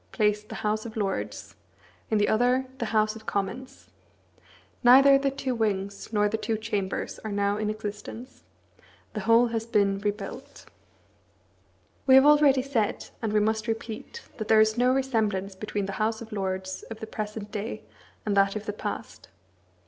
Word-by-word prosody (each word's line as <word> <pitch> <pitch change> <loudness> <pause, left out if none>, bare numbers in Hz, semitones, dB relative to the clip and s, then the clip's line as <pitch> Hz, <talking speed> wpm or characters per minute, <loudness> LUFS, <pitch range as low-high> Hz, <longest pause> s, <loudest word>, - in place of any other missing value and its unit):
placed 210 -1 0
the - - -6
House 215 +1 0
of 225 -1 -8
Lords, 195 -3 -3 0.5
in 220 - +2
the 205 - +3
other 250 +4 +2
the 235 - -1
House 215 0 +1
of 220 -1 -12
Commons. 230 +7 -4 0.9
Neither 275 +3 +8
the 275 0 +1
two 270 -1 -3
wings 200 -4 -2
nor 210 -1 +3
the 220 +1 -2
two 225 -1 -1
chambers 205 -3 -3
are 215 - -6
now 200 0 +1
in 210 0 -1
existence. 215 +3 -7 0.7
The 215 - -3
whole 230 +3 +4
has 225 0 -3
been 200 -4 +2
rebuilt. 205 +5 -5 1.4
We 260 - +8
have 265 +1 +8
already 290 -3 +5
said, 240 -7 -1
and 220 -2 -1
we 210 0 +3
must 220 +1 0
repeat, 225 - -5
that 215 -2 -4
there 220 - +6
is 220 0 +4
no 250 +1 +3
resemblance 220 -7 0
between 205 +1 -3
the 195 - -4
House 220 +1 0
of 230 -1 -10
Lords 190 -2 -3
of 225 -1 -7
the - - -5
present 210 -1 -6
day 215 +1 -5 0.4
and 205 -2 0
that 195 0 +3
of 215 0 -4
the 205 - -3
past. - - -6
215 Hz, 170 wpm, -27 LUFS, 205-235 Hz, 1.4 s, Neither